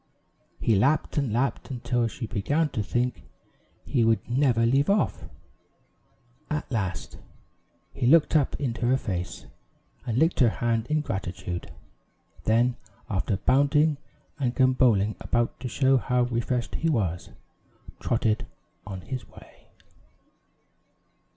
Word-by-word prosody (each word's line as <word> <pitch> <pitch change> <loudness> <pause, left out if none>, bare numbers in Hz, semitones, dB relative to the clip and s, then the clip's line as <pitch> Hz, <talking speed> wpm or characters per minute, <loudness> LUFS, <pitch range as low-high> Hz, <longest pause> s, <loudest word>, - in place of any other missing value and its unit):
He 115 - +2
lapped 140 +10 +2
and 135 -6 -1
lapped, 125 +5 -1
until 120 -2 -1
she 115 +1 -6
began 145 +10 0
to 110 - -2
think 120 +3 -1 0.6
he 125 -5 +1
would 115 0 +2
never 120 -2 +2
leave 135 +6 +2
off. 200 +1 +1 1.2
At 150 -2 -3
last, 95 - -3 0.7
he 120 - -1
looked 160 +3 +5
up 145 -3 +2
into 120 -4 -1
her 130 +2 +4
face, 90 -8 -4 0.6
and 115 -1 -1
licked 160 +5 +2
her 125 -4 +6
hand 115 0 -1
in 155 0 +1
gratitude; 90 -6 -5 0.7
then, 120 +2 +2 0.3
after 95 0 0
bounding 145 +7 +3 0.4
and 125 -3 0
gamboling 125 -6 +3
about 120 -1 -1
to 125 - -4
show 135 +2 +3
how 125 0 +1
refreshed 120 0 -1
he 165 - 0
was, 95 - -1 0.7
trotted 110 -2 0 0.4
on 95 -2 -6
his 130 +6 -6
way. - - -17
120 Hz, 125 wpm, -26 LUFS, 110-135 Hz, 1.2 s, her